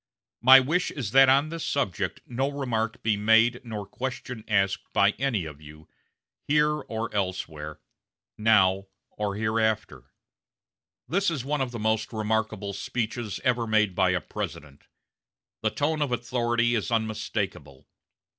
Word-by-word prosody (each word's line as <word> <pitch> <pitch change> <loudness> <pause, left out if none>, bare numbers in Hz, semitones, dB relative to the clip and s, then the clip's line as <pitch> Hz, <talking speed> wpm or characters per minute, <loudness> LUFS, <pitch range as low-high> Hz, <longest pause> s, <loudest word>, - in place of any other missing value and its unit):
My 130 +3 +9
wish 155 +8 0
is 120 -8 -5
that 135 +1 +7
on 140 +3 +4
this 165 0 -5
subject 135 -11 -2
no 130 +3 -1
remark 125 -5 -2
be 110 -2 +2
made 115 +3 +4
nor 110 -4 -6
question 125 -1 -6
asked 100 -2 0
by 100 +1 +4
any 120 -10 0
of 75 -1 -10
you, 75 +1 -14 0.6
here 150 +1 +3
or 115 -4 -5
elsewhere, 80 -6 -3 0.6
now 100 -3 +3 0.2
or 105 -1 -3
hereafter." 110 - -1 1.0
This 195 +8 +1
is 145 -7 -3
one 145 0 -1
of 130 - -1
the 120 - -6
most 110 0 0
remarkable 110 -2 -1
speeches 115 -1 -3
ever 120 -3 +1
made 110 -3 +2
by 95 0 +2
a 90 -1 +1
President. 70 -1 -7 0.7
The - - +1
tone 155 +1 -1
of 145 -3 0
authority 120 -1 0
is 110 -4 -1
unmistakable. 110 - -3
110 Hz, 140 wpm, -26 LUFS, 100-130 Hz, 1.0 s, My